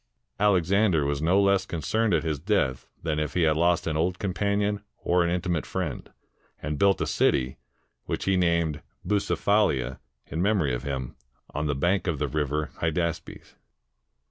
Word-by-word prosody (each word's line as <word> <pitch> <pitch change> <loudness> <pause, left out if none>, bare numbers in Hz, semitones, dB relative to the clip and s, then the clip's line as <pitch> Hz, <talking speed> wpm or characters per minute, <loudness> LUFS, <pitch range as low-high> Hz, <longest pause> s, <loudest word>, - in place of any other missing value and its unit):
Alexander 95 -4 +3
was 70 0 -1
no 90 +5 +3
less 100 -1 +3
concerned 110 +7 0
at 80 -3 +2
his 80 -3 -2
death 80 - 0 0.2
than 75 -2 -1
if 75 -2 -3
he 90 - +3
had 80 -1 +3
lost 85 +1 +2
an 80 - -1
old 85 +3 0
companion 100 +1 0 0.2
or 90 0 +2
an 85 - 0
intimate 85 -2 -1
friend, 90 -7 -4 0.5
and 75 0 -4
built 100 -1 +4
a - - +1
city, 65 0 +1 0.5
which - - -3
he 95 - +2
named 85 -4 +1 0.2
Bucephaha, 100 - +1 0.3
in 80 - -4
memory 95 -9 +2
of - - -2
him, 65 -3 -4 0.4
on 75 +1 -1
the 70 - 0
bank 90 +6 +1
of 80 -4 0
the - - -1
river 75 0 -1
Hydaspes. 85 0 -3
85 Hz, 165 wpm, -26 LUFS, 75-95 Hz, 0.5 s, built